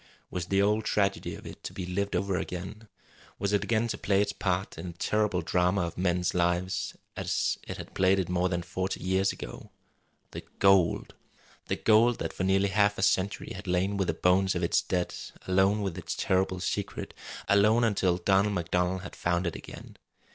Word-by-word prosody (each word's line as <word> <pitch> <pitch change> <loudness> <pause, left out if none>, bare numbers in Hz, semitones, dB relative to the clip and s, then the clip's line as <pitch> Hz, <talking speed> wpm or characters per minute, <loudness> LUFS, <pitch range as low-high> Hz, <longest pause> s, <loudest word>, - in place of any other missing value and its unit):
Was 90 -1 -3
the 100 +1 +3
old 105 +2 +2
tragedy 100 -2 0
of - - -12
it - - -10
to - - -6
be 95 - -5
lived 100 +2 -2
over 95 +1 0
again? 95 +5 -5 0.5
Was 100 0 -1
it 105 - +2
again 115 0 +1
to - - -3
play 100 -1 +2
its 100 0 +1
part 95 -2 -1
in 85 - -6
a - - -5
terrible 105 0 0
drama 90 +3 +2
of 85 -1 -3
men's 90 -1 0
lives, 90 +2 0 0.2
as - - -1
it - - -5
had - - -9
played 95 +1 +3
it 95 -3 0
more 90 0 +1
than 85 -1 -2
forty 95 +2 -3
years 95 +1 +2
ago? - - -9 0.6
The - - -6 0.2
gold! 95 -3 +3 0.5
The - - 0
gold 115 +2 +4
that - - -4
for - - -3
nearly 95 +1 +3
half 100 +1 +2
a - - -1
century 100 0 +1
had 95 +1 -9
lain 90 +3 +1
with 95 -2 0
the - - 0
bones 95 +1 +3
of 90 - -1
its 85 - +3
dead, 90 -2 -1 0.3
alone 95 +3 +3
with 95 -4 -2
its 85 - -4
terrible 95 0 +1
secret, 100 +2 -3 0.3
alone 105 +4 +4
until 95 -5 +2
Donald 95 +3 +2
MacDonald 90 +1 0
had 90 - -8
found 85 +1 0
it 85 - -2
again! - - -10
95 Hz, 195 wpm, -28 LUFS, 90-100 Hz, 0.6 s, gold